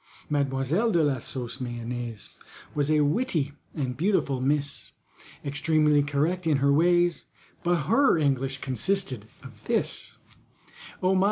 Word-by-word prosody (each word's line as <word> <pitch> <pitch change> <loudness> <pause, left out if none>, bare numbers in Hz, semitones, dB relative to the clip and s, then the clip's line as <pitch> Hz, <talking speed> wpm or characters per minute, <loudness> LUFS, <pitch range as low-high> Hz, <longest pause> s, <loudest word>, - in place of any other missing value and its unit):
MADEMOISELLE 145 - +1
DE 170 -2 +4
LA 140 -3 +1
SAUCE 125 +2 -5
MAYONNAISE 120 -2 -5 0.4
Was 145 0 0
a 155 -1 +4
witty 150 - +1 0.2
and 130 -4 -2
beautiful 150 -7 +1
miss, 145 +1 -1 0.5
Extremely 150 +1 +2
correct 155 +5 0
in 150 -3 +3
her 140 +1 +3
ways, 175 +2 +3 0.4
But 175 -2 +1
her 270 - +4
English 135 -2 0
consisted 130 - -1 0.2
of - - -13
this: - - -1 0.9
"Oh 185 +1 +4
my! 190 - +3
145 Hz, 125 wpm, -26 LUFS, 135-170 Hz, 0.9 s, DE